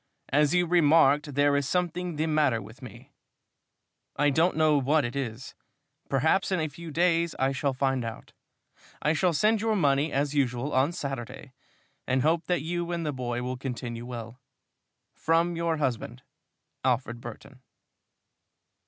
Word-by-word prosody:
As 150 Hz, +4 st, +3 dB
you 180 Hz, 0 st, +3 dB
remarked, 150 Hz, -4 st, +4 dB
there 145 Hz, 0 st, +3 dB
is 140 Hz, -1 st, 0 dB
something 180 Hz, -1 st, -1 dB
the 155 Hz, +2 st, 0 dB
matter 150 Hz, -7 st, +2 dB
with 110 Hz, +5 st, -12 dB
me. 125 Hz, -5 st, -12 dB, 1.0 s
I 145 Hz, 0 st, +2 dB
don't 160 Hz, +4 st, +2 dB
know 155 Hz, -1 st, +4 dB
what 145 Hz, +2 st, +2 dB
it 120 Hz, -, -5 dB
is. 125 Hz, -2 st, -5 dB, 0.6 s
Perhaps 160 Hz, +9 st, +2 dB
in 185 Hz, -, +1 dB
a 155 Hz, -1 st, -1 dB
few 165 Hz, +3 st, -10 dB
days 170 Hz, +1 st, +1 dB
I 135 Hz, +1 st, +1 dB
shall 135 Hz, 0 st, -1 dB
find 135 Hz, -1 st, 0 dB
out. 115 Hz, -1 st, -8 dB, 0.7 s
I 150 Hz, -, +1 dB
shall 175 Hz, +3 st, +2 dB
send 210 Hz, +7 st, +2 dB
your 220 Hz, -1 st, +1 dB
money 145 Hz, -3 st, +2 dB
as 145 Hz, +1 st, 0 dB
usual 135 Hz, -1 st, 0 dB
on 130 Hz, +5 st, +2 dB
Saturday, 135 Hz, -4 st, -6 dB, 0.5 s
and 130 Hz, 0 st, +1 dB
hope 165 Hz, +2 st, +1 dB
that 175 Hz, -5 st, 0 dB
you 175 Hz, +1 st, -3 dB
and 170 Hz, -1 st, -2 dB
the 150 Hz, -, -1 dB
boy 120 Hz, -2 st, -3 dB
will 125 Hz, +1 st, -3 dB
continue 120 Hz, -2 st, -5 dB
well. 120 Hz, 0 st, -7 dB, 0.7 s
From 165 Hz, +2 st, +1 dB
your 165 Hz, -1 st, 0 dB
husband, 120 Hz, -, -3 dB, 0.6 s
ALFRED 120 Hz, -2 st, 0 dB
BURTON. 120 Hz, +3 st, -11 dB
145 Hz, 155 wpm, -27 LUFS, 130-165 Hz, 1.0 s, remarked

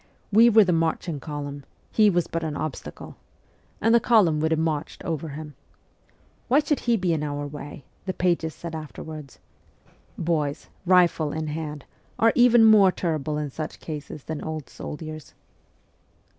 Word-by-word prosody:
We 225 Hz, +3 st, +7 dB
were 220 Hz, -1 st, +7 dB
the 180 Hz, -2 st, +1 dB
marching 165 Hz, -1 st, -1 dB
column 145 Hz, -1 st, -6 dB, 0.3 s
he 215 Hz, -1 st, +5 dB
was 175 Hz, -3 st, +1 dB
but 165 Hz, 0 st, -4 dB
an 155 Hz, -2 st, -3 dB
obstacle 155 Hz, -4 st, -6 dB, 0.6 s
and 225 Hz, +2 st, +3 dB
the 235 Hz, -, +7 dB
column 200 Hz, -11 st, +4 dB
would 160 Hz, +1 st, +1 dB
have 160 Hz, -1 st, +1 dB
marched 160 Hz, -2 st, -2 dB
over 160 Hz, -1 st, -3 dB
him. 150 Hz, +1 st, -8 dB, 0.5 s
' -, -, -36 dB
Why 255 Hz, -, +4 dB
should 295 Hz, -1 st, +2 dB
he 235 Hz, -1 st, +1 dB
be 180 Hz, -3 st, 0 dB
in 155 Hz, -, -1 dB
our 145 Hz, -1 st, -3 dB
way? 145 Hz, -1 st, -9 dB
' -, -, -37 dB
the 185 Hz, -, -1 dB
pages 170 Hz, -3 st, 0 dB
said 170 Hz, -1 st, -7 dB
after 155 Hz, -2 st, -7 dB
wards. 155 Hz, -4 st, -9 dB, 0.8 s
Boys, 155 Hz, -3 st, -1 dB, 0.2 s
rifle 175 Hz, -4 st, +4 dB
in 160 Hz, +1 st, -3 dB
hand, 150 Hz, -1 st, -5 dB, 0.3 s
are 225 Hz, 0 st, +5 dB
even 240 Hz, -2 st, +6 dB
more 210 Hz, -4 st, +7 dB
terrible 155 Hz, -4 st, -2 dB
in 150 Hz, -2 st, -3 dB
such 155 Hz, +3 st, -6 dB
cases 150 Hz, -2 st, -7 dB
than 155 Hz, -1 st, -5 dB
old 155 Hz, -3 st, -5 dB
soldiers. 155 Hz, 0 st, -8 dB
160 Hz, 170 wpm, -25 LUFS, 150-185 Hz, 0.8 s, We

